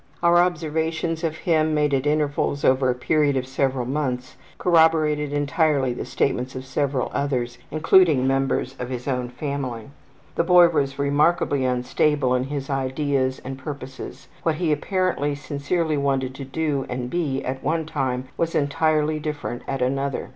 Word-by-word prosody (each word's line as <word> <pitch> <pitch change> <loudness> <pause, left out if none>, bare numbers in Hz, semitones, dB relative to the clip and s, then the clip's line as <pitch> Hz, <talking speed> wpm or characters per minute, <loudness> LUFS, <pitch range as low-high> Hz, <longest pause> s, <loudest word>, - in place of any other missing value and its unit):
Our 170 0 +5
observations 160 -1 -1
of 160 -1 -1
him 155 -2 +1
made 150 -1 +1
at 135 +1 +1
intervals 145 -1 0
over 130 0 +3
a 125 - +1
period 145 +2 +1
of 130 - -1
several 130 -1 -1
months 130 -2 -3 0.2
corroborated 160 -4 +3
entirely 145 -2 +1
the - - -5
statements 130 -1 -1
of 130 0 -6
several 135 -1 -1
others, 125 -4 -2
including 155 -3 +4
members 135 -1 0
of 125 - -4
his 125 0 -5
own 125 -2 -1
family. 130 -2 -5 0.4
The - - +1
boy 175 0 +7
was 140 -4 -1
remarkably 145 -1 +2
unstable 130 +2 +1
in 125 0 +1
his 140 -1 -4
ideas 135 -1 -1
and 135 0 -6
purposes. 135 -1 -8
What 160 -2 +1
he 165 -1 0
apparently 150 -2 0
sincerely 150 +2 -1
wanted 135 -2 0
to 135 0 -7
do 145 -1 -2
and 125 0 -3
be 140 -2 -2
at 130 +1 -4
one 160 +3 0
time 130 -5 -2
was 165 0 -1
entirely 155 +1 +1
different 150 -5 -4
at 135 -2 -1
another. 135 +1 -1
140 Hz, 155 wpm, -23 LUFS, 130-155 Hz, 0.4 s, boy